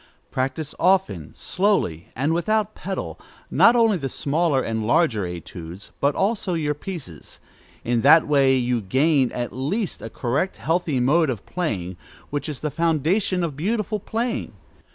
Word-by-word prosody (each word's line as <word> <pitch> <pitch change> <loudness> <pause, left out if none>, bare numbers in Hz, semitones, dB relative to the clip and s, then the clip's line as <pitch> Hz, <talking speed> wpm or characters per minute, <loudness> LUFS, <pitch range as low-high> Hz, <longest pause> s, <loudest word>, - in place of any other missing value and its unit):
Practise 135 +4 -2
often, 170 - +2
slowly, 180 - 0
and 140 +6 +1
without 215 +5 0
pedal, 190 0 -5 0.3
not 235 - +6
only 225 -4 +4
the 135 -2 -3
smaller 145 0 +1
and 110 -1 -2
larger 125 - +2
études, 85 +1 -8
but 140 +1 +2
also 195 -2 0
your 150 -2 0
pieces. 145 - -8 0.4
In 120 -1 +1
that 150 +5 +6
way 135 -3 +4
you 125 -2 0
gain, 135 +6 +2
at 120 -1 -4
least, 175 - -2
a 115 - -6
correct, 135 - -1
healthy 165 -4 0
mode 150 +5 +3
of 115 -6 -4
playing, 95 - -3 0.3
which 145 +2 -3
is 145 - -5
the 150 - -2
foundation 170 +4 +1
of 160 -5 -2
beautiful 210 +6 -1
playing. 230 +4 -3
150 Hz, 150 wpm, -23 LUFS, 125-180 Hz, 0.4 s, not